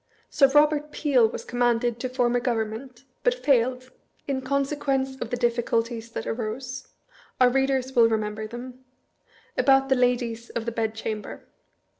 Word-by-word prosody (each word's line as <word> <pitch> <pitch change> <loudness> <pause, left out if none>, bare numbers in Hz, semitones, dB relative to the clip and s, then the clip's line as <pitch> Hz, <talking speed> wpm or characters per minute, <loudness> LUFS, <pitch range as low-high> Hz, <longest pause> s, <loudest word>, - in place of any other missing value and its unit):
Sir 275 - +5
Eobert 295 +1 +3
Peel 265 -8 +3
was - - -7
commanded 240 -1 +1
to 255 - -3
form 245 -1 +1
a - - +3
Government, 240 +1 -3 0.2
but - - +3
failed, 255 - +1 0.4
in 270 -2 -1
consequence 275 0 -1
of 240 - -3
the 245 - -2
difficulties 235 -1 -1
that - - -4
arose 240 +3 -4 0.5
(our 250 -1 +6
readers 265 0 0
will 230 -1 +6
remember 215 -1 -2
them) 250 +3 -9 0.7
about 270 +1 +4
the 265 - +4
Ladies 240 -2 0
of 230 - -4
the 235 - -2
Bedchamber. 220 -1 -4
245 Hz, 145 wpm, -25 LUFS, 230-265 Hz, 0.7 s, our